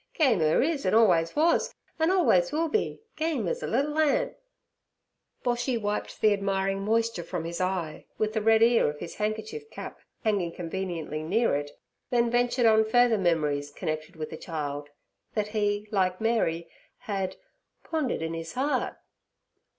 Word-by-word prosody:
Game 260 Hz, -, +3 dB
'er 155 Hz, +7 st, +3 dB
is 300 Hz, -1 st, 0 dB
an' 185 Hz, -, +2 dB
always 175 Hz, -8 st, +4 dB
wuz, 325 Hz, +3 st, +2 dB, 0.2 s
an' 320 Hz, +1 st, +3 dB
always 315 Hz, -, +3 dB
will 320 Hz, +2 st, 0 dB
be—game 330 Hz, -5 st, -2 dB
az -, -, -2 dB
a -, -, -3 dB
liddle 295 Hz, +2 st, 0 dB
ant!' 315 Hz, -, +2 dB, 1.1 s
Boshy 245 Hz, 0 st, 0 dB
wiped 210 Hz, -1 st, -3 dB
the 215 Hz, -1 st, +5 dB
admiring 195 Hz, -1 st, -1 dB
moisture 225 Hz, -2 st, 0 dB
from 170 Hz, -1 st, -4 dB
his 170 Hz, +2 st, -4 dB
eye 185 Hz, -4 st, -2 dB
with 215 Hz, 0 st, 0 dB
the 220 Hz, -, 0 dB
red 225 Hz, +1 st, +5 dB
ear 230 Hz, -7 st, +4 dB
of 150 Hz, -, -6 dB
his 165 Hz, -, -7 dB
handkerchief 220 Hz, -, -3 dB
cap -, -, -8 dB, 0.2 s
hanging 200 Hz, -7 st, 0 dB
conveniently 170 Hz, -3 st, -4 dB
near 200 Hz, +5 st, +1 dB
it, 145 Hz, 0 st, -2 dB, 0.4 s
then 235 Hz, -1 st, +2 dB
ventured 245 Hz, 0 st, +2 dB
on 220 Hz, -1 st, +6 dB
further 230 Hz, 0 st, +3 dB
memories 150 Hz, -5 st, +1 dB
connected 155 Hz, +2 st, -4 dB
with 155 Hz, -1 st, -6 dB
the -, -, -6 dB
child 145 Hz, -3 st, -5 dB, 0.5 s
that 210 Hz, -1 st, 0 dB
he, 205 Hz, -1 st, 0 dB
like 185 Hz, -3 st, +1 dB
Mary, 195 Hz, -8 st, 0 dB, 0.3 s
had 190 Hz, -2 st, -3 dB, 0.5 s
'pondered 300 Hz, -, -1 dB
in 165 Hz, 0 st, -3 dB
his 165 Hz, 0 st, -6 dB
heart.' 275 Hz, +3 st, -1 dB
210 Hz, 160 wpm, -27 LUFS, 170-245 Hz, 1.1 s, on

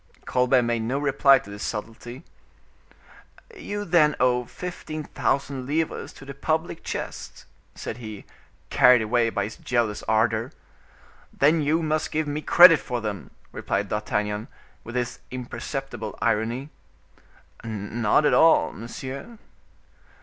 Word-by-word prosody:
Colbert 125 Hz, 0 st, +3 dB
made 120 Hz, 0 st, 0 dB
no 120 Hz, +5 st, -1 dB
reply 140 Hz, -1 st, +4 dB
to 100 Hz, -, -9 dB
this 100 Hz, 0 st, -8 dB
subtlety. 120 Hz, +5 st, -6 dB, 1.3 s
"You 205 Hz, -, -5 dB
then 155 Hz, -4 st, +4 dB
owe 125 Hz, -1 st, +2 dB
fifteen 155 Hz, -1 st, -6 dB
thousand 135 Hz, -2 st, -2 dB
livres 160 Hz, +3 st, -2 dB
to 135 Hz, -, -13 dB
the 140 Hz, -, -7 dB
public 160 Hz, +4 st, -2 dB
chest," -, -, -6 dB, 0.3 s
said 115 Hz, -, -6 dB
he, 110 Hz, -4 st, -9 dB, 0.5 s
carried 125 Hz, -2 st, +6 dB
away 115 Hz, +1 st, +2 dB
by 100 Hz, -2 st, -1 dB
his 105 Hz, +2 st, -6 dB
jealous 120 Hz, -4 st, -1 dB
ardor. 110 Hz, +2 st, +1 dB, 0.8 s
"Then 155 Hz, +3 st, +3 dB
you 155 Hz, +3 st, +1 dB
must 155 Hz, 0 st, -1 dB
give 155 Hz, 0 st, 0 dB
me 145 Hz, +1 st, -3 dB
credit 175 Hz, 0 st, +8 dB
for 125 Hz, -2 st, -4 dB
them," 105 Hz, -5 st, -5 dB, 0.2 s
replied 100 Hz, 0 st, -2 dB
D'Artagnan, 105 Hz, 0 st, -2 dB, 0.4 s
with 120 Hz, -, -9 dB
his 125 Hz, 0 st, -2 dB
imperceptible 130 Hz, -2 st, -6 dB
irony. 115 Hz, +6 st, -1 dB, 0.9 s
"Not 110 Hz, +4 st, 0 dB
at -, -, +3 dB
all, 165 Hz, -, +5 dB
monsieur." 135 Hz, -, -8 dB
125 Hz, 130 wpm, -25 LUFS, 110-150 Hz, 1.3 s, credit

